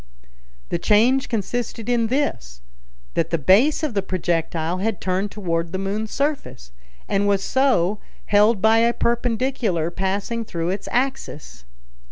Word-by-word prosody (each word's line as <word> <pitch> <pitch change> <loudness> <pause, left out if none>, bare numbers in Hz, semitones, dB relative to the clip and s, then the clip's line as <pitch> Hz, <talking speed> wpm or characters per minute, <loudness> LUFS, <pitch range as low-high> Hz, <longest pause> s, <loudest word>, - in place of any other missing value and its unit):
The 170 - -1
change 240 +8 +3
consisted 230 +1 -3
in 240 -2 +2
this, 60 - -2 0.5
that 165 -1 0
the 165 - +1
base 210 - +4
of 300 -6 -1
the 200 - +1
projectile 170 -2 -1
had 215 -1 -1
turned 190 +2 -1
toward 170 -5 -2
the - - -1
moon's 205 +3 -3
surface, 275 - -3 0.4
and 200 0 +1
was 200 -1 +2
so 215 -8 +2 0.3
held 210 0 +3
by 220 +1 +5
a 235 +1 +3
perpendicular 235 -8 0
passing 200 +6 -2
through 170 -5 -3
its 195 - -5
axis. 240 - -3
205 Hz, 140 wpm, -22 LUFS, 175-235 Hz, 0.5 s, by